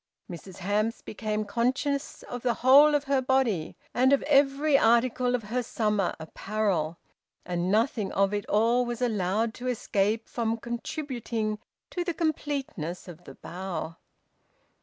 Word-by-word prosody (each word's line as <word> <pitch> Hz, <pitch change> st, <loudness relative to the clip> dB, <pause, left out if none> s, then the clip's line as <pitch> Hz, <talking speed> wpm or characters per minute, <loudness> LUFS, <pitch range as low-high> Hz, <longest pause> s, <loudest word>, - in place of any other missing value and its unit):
Mrs 175 Hz, +1 st, -9 dB
Hamps 210 Hz, +5 st, -1 dB
became 215 Hz, 0 st, -3 dB
conscious 260 Hz, +6 st, -1 dB
of 245 Hz, -1 st, -6 dB
the 240 Hz, -1 st, +1 dB
whole 290 Hz, +3 st, +8 dB
of 290 Hz, -, +1 dB
her 275 Hz, -2 st, +1 dB
body 250 Hz, -11 st, 0 dB, 0.2 s
and 255 Hz, +2 st, +3 dB
of 280 Hz, -, +3 dB
every 280 Hz, +1 st, +3 dB
article 245 Hz, 0 st, +3 dB
of 240 Hz, -, -3 dB
her 235 Hz, +4 st, -2 dB
summer 210 Hz, -5 st, 0 dB
apparel, 170 Hz, -1 st, -2 dB, 0.5 s
and 175 Hz, +1 st, -1 dB
nothing 220 Hz, -1 st, +1 dB
of 195 Hz, +1 st, +2 dB
it 205 Hz, 0 st, -2 dB
all 230 Hz, +4 st, +3 dB
was 240 Hz, -1 st, -4 dB
allowed 220 Hz, 0 st, 0 dB
to 250 Hz, +2 st, -6 dB
escape 220 Hz, -2 st, 0 dB
from 230 Hz, -1 st, -1 dB
contributing 235 Hz, -3 st, -4 dB, 0.3 s
to 355 Hz, -, -2 dB
the 345 Hz, -2 st, -3 dB
completeness 280 Hz, -, -3 dB
of 175 Hz, 0 st, -11 dB
the -, -, -11 dB
bow. 175 Hz, -3 st, -6 dB
230 Hz, 140 wpm, -27 LUFS, 200-260 Hz, 0.5 s, whole